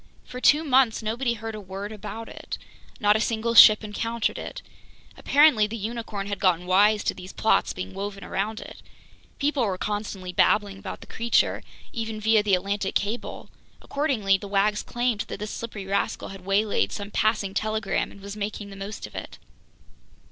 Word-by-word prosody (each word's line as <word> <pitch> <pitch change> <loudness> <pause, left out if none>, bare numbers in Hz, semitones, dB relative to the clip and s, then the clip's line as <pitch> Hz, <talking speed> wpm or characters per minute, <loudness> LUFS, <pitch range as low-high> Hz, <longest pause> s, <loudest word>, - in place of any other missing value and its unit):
For 250 - -8
two 300 +4 +5
months 260 -6 +3
nobody 235 +3 -1
heard 225 0 -6
a 215 - -6
word 195 +2 -6
about 215 +1 -7
it. - - -7 0.4
Not 210 0 +4
a - - +2
single 230 +1 0
ship 215 -1 +9
encountered 225 +2 -2
it. - - -7 0.5
Apparently 280 -7 +5
the 225 +2 -5
unicorn 220 -2 -4
had 200 0 -4
gotten 180 -2 +2
wise 205 +3 +4
to - - 0
these 185 0 -10
plots 220 - +2
being 190 +1 -6
woven 200 +1 -5
around 215 +3 -2
it. - - -11 0.6
People 285 -2 +1
were 195 -4 -1
constantly 205 -3 -4
babbling 200 +1 +2
about 195 -1 -7
the - - -10
creature, 235 0 +1 0.3
even 225 -2 -4
via 220 0 +4
the 205 -2 +3
Atlantic 195 +1 -2
Cable! 210 +4 -3 0.3
Accordingly, 230 -10 +1
the 200 - -7
wags 205 +1 +2
claimed 240 -3 -1
that - - -5
this 210 +1 -5
slippery 220 -4 -6
rascal 195 +1 -1
had 195 -1 -9
waylaid 200 +3 +1
some 205 0 -6
passing 215 -3 +1
telegram 215 0 -1
and 200 - -14
was 200 +1 -7
making 205 -1 -5
the - - -9
most 195 +2 -6
of - - -12
it. - - -7
210 Hz, 175 wpm, -25 LUFS, 195-225 Hz, 0.6 s, ship